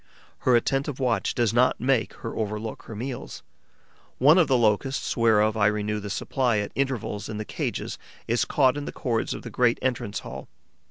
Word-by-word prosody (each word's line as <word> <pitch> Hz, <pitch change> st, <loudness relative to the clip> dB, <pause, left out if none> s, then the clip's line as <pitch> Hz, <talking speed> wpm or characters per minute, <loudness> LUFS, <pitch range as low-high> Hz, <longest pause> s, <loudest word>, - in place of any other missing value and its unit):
Her 125 Hz, -, +3 dB
attentive 135 Hz, +3 st, 0 dB
watch 125 Hz, -3 st, 0 dB
does 120 Hz, -2 st, +1 dB
not 125 Hz, +2 st, +3 dB
make 125 Hz, -2 st, +1 dB
her 115 Hz, -, -4 dB
overlook 110 Hz, 0 st, -3 dB
her 110 Hz, -, -8 dB
meals. 125 Hz, +4 st, -6 dB, 0.7 s
One 150 Hz, +7 st, +6 dB
of 170 Hz, -, +4 dB
the 130 Hz, -2 st, +3 dB
Locusts 120 Hz, +4 st, +1 dB
whereof 110 Hz, -2 st, +3 dB
I 105 Hz, -2 st, +3 dB
renew 105 Hz, 0 st, -1 dB
the 100 Hz, 0 st, -6 dB
supply 120 Hz, +3 st, 0 dB
at 105 Hz, 0 st, -2 dB
intervals 130 Hz, -7 st, -2 dB
in 110 Hz, -, -4 dB
the 110 Hz, -, -4 dB
cages -, -, -4 dB, 0.3 s
is 115 Hz, 0 st, +2 dB
caught 135 Hz, -1 st, +2 dB
in 145 Hz, -, -4 dB
the -, -, -5 dB
cords 115 Hz, -4 st, -1 dB
of -, -, -8 dB
the -, -, -7 dB
great 120 Hz, -1 st, +2 dB
entrance 120 Hz, -5 st, -1 dB
hall. -, -, -8 dB
115 Hz, 185 wpm, -25 LUFS, 105-130 Hz, 0.7 s, One